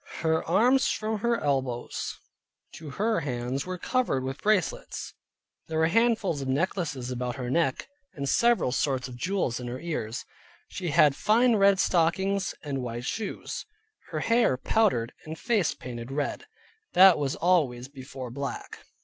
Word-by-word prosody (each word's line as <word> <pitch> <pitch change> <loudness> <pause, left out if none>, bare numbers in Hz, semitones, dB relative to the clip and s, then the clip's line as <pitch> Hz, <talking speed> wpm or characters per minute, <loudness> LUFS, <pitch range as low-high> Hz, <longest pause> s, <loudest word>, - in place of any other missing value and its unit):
Her 160 -1 +1
arms 245 +10 +4
from 215 0 -1
her 235 +2 +1
elbows 135 -4 -2 0.6
to 155 -2 -9
her 215 +9 0
hands 130 0 -3
were 185 0 -3
covered 210 - 0
with 135 +1 -5
bracelets; 215 - -1 0.5
there 160 - -3
were 160 +1 +3
handfuls 220 -7 +2
of 135 - -4
necklaces 140 -3 -1
about 125 0 -3
her 125 -2 -4
neck, 160 -4 0 0.3
and 140 -1 -4
several 235 - +3
sorts 130 -1 0
of 125 - -9
jewels 175 -4 -1
in 125 - -6
her 125 +2 -5
ears. 130 -8 -4 0.4
She 180 - -5
had 145 -1 +5
fine 230 - +3
red 200 -2 +4
stockings, 190 +3 +1
and 140 -3 -3
white 120 0 -5
shoes, 215 +5 -4 0.4
her - - -3
hair 230 - +3
powdered 130 - +1
and 160 +1 -6
face 215 -7 +1
painted 120 0 -7
red, 145 +1 -3 0.5
that 185 -2 +8
was 140 -2 -1
always 145 -8 +1
before 130 -2 -8
black. 140 +2 -5
155 Hz, 150 wpm, -27 LUFS, 130-200 Hz, 0.6 s, that